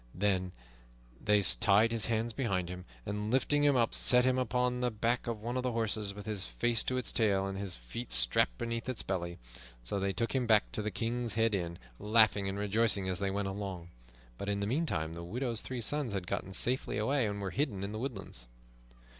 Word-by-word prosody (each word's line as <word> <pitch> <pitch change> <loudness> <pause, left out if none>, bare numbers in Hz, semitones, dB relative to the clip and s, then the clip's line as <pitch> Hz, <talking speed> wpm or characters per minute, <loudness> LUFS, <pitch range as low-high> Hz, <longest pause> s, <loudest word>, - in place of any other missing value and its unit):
Then 95 -1 0 0.7
they 105 0 +4
tied 105 +3 +4
his 115 -2 +1
hands 115 0 -1
behind 100 -10 -1
him, 90 0 -7 0.2
and 105 +1 -3
lifting 145 +4 +2
him 145 -2 +4
up 115 -2 +2
set 125 0 +7
him 130 0 +2
upon 125 +1 0
the 125 0 +1
back 120 +3 -1
of 115 -2 -3
one 120 +2 -2
of - - 0
the 125 -1 -2
horses, 110 -3 -1
with 105 - -9
his 105 - -2
face 110 - +1
to 130 - -1
its 125 - 0
tail 100 -4 +2
and 95 0 -4
his 95 -2 -4
feet - - -7
strapped - - +3
beneath 115 +1 -3
its 130 - -1
belly. 85 -2 -3 0.5
So 100 +11 -1
they 100 0 0
took 115 +5 -2
him 130 -3 0
back 110 -2 +4
to - - -2
the 105 - -2
King's 115 +3 -2
Head 115 -1 +2
Inn, 85 -3 -2 0.2
laughing 105 -2 +3
and 95 - -4
rejoicing 105 -1 +2
as 95 -1 -2
they 100 -1 0
went 100 +1 -2
along. 95 -3 -5 0.5
But 100 - -4
in 100 0 -1
the 100 - -1
meantime 105 - -1
the 85 0 -7
widow's 115 +5 -1
three 130 -2 -5
sons 140 -1 0
had 95 -2 -3
gotten 95 - -4
safely 125 0 0
away, 120 +3 +1
and 100 0 -4
were 95 -2 -3
hidden 120 -10 -1
in 100 - -4
the 110 - -5
woodlands. 100 - -6
105 Hz, 215 wpm, -32 LUFS, 95-120 Hz, 0.7 s, set